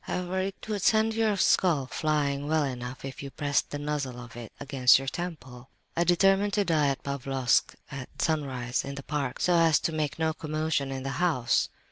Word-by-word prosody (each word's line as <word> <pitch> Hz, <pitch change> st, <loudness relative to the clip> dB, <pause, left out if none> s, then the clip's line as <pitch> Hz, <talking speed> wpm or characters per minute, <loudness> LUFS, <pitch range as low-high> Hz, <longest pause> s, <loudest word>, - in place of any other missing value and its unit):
However, 180 Hz, +1 st, -2 dB
it 190 Hz, +2 st, -4 dB
would 210 Hz, -2 st, -2 dB
send 220 Hz, +2 st, +3 dB
your 220 Hz, -2 st, +1 dB
skull 165 Hz, -8 st, +3 dB
flying 145 Hz, 0 st, -1 dB
well 155 Hz, 0 st, +2 dB
enough 125 Hz, -1 st, -5 dB
if 135 Hz, -, -7 dB
you 140 Hz, -, -6 dB
pressed 140 Hz, +2 st, -1 dB
the 145 Hz, -, -4 dB
muzzle 145 Hz, -4 st, -3 dB
of 120 Hz, -1 st, -11 dB
it 120 Hz, -3 st, -8 dB
against 135 Hz, -3 st, +5 dB
your 135 Hz, +1 st, -5 dB
temple. 135 Hz, -7 st, -6 dB, 0.3 s
"I 170 Hz, -, +2 dB
determined 195 Hz, +3 st, +3 dB
to 205 Hz, -1 st, +2 dB
die 155 Hz, -5 st, +2 dB
at 135 Hz, -1 st, -2 dB
Pavlofsk 135 Hz, -2 st, 0 dB, 0.2 s
at 135 Hz, -2 st, -8 dB
sunrise, 130 Hz, -6 st, -1 dB
in 140 Hz, 0 st, -6 dB
the 140 Hz, -, -7 dB
park—so 150 Hz, +4 st, -1 dB
as 165 Hz, -2 st, +5 dB
to -, -, -1 dB
make 155 Hz, -2 st, -2 dB
no 160 Hz, -1 st, 0 dB
commotion 155 Hz, -3 st, -2 dB
in 135 Hz, -1 st, -4 dB
the -, -, -4 dB
house. 140 Hz, -10 st, +2 dB
145 Hz, 190 wpm, -28 LUFS, 135-170 Hz, 0.3 s, against